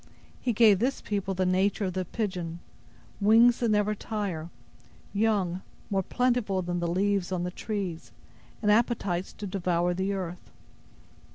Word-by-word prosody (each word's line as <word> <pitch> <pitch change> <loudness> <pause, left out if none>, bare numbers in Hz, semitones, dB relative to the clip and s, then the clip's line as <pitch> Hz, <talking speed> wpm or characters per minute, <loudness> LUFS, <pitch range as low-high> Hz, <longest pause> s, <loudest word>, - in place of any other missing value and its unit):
He 250 - +1
gave 215 -4 +5
this 255 +5 0
people 200 -2 -2
the 185 0 +1
nature 190 +3 +2
of 185 - -2
the 185 0 -2
pigeon; 180 -5 -3 0.6
wings 230 +4 +6
that 235 - +1
never 210 0 +2
tire; 195 -7 -4 0.6
young, 200 -4 +1 0.3
more 195 -1 +2
plentiful 235 -3 0
than 175 0 -2
the 175 - -1
leaves 190 +1 +1
on 180 -2 -1
the 180 - -2
trees, 190 -5 -4 0.5
and 210 - +4
appetites 210 -5 +1
to 210 - -7
devour 180 -2 0
the 190 +2 -1
earth. 180 -2 -5
195 Hz, 150 wpm, -28 LUFS, 180-210 Hz, 0.6 s, wings